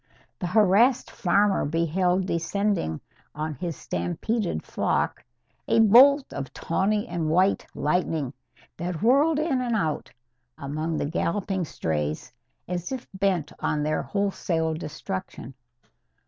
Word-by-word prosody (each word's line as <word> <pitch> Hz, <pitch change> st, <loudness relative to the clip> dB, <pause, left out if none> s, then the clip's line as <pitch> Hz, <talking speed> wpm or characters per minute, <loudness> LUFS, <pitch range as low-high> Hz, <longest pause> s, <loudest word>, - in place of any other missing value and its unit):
The 180 Hz, -, -2 dB
harassed 215 Hz, +6 st, +4 dB
farmer 200 Hz, +2 st, +2 dB
beheld 175 Hz, +4 st, +1 dB
descending 175 Hz, -, -1 dB, 0.3 s
on 155 Hz, +1 st, -3 dB
his 165 Hz, +3 st, -4 dB
stampeded 90 Hz, -, -2 dB
flock -, -, -1 dB, 0.4 s
a -, -, +3 dB
bolt 260 Hz, +6 st, +6 dB
of 140 Hz, -1 st, -5 dB
tawny 205 Hz, +5 st, 0 dB
and 170 Hz, -2 st, -2 dB
white 185 Hz, +5 st, +2 dB
lightning 150 Hz, -3 st, 0 dB, 0.4 s
that 175 Hz, +1 st, -4 dB
whirled 285 Hz, +6 st, +4 dB
in 300 Hz, -4 st, 0 dB
and 240 Hz, -2 st, 0 dB
out 160 Hz, -8 st, -1 dB, 0.5 s
among 155 Hz, +3 st, -3 dB
the -, -, -1 dB
galloping 180 Hz, +4 st, -1 dB
strays 75 Hz, -, -3 dB, 0.3 s
as 180 Hz, +2 st, -4 dB
if 260 Hz, -2 st, -5 dB
bent 190 Hz, -6 st, 0 dB
on 150 Hz, -1 st, 0 dB
their 155 Hz, +1 st, 0 dB
wholesale 175 Hz, -5 st, -1 dB
destruction. 160 Hz, -2 st, -6 dB
180 Hz, 120 wpm, -25 LUFS, 155-205 Hz, 0.5 s, bolt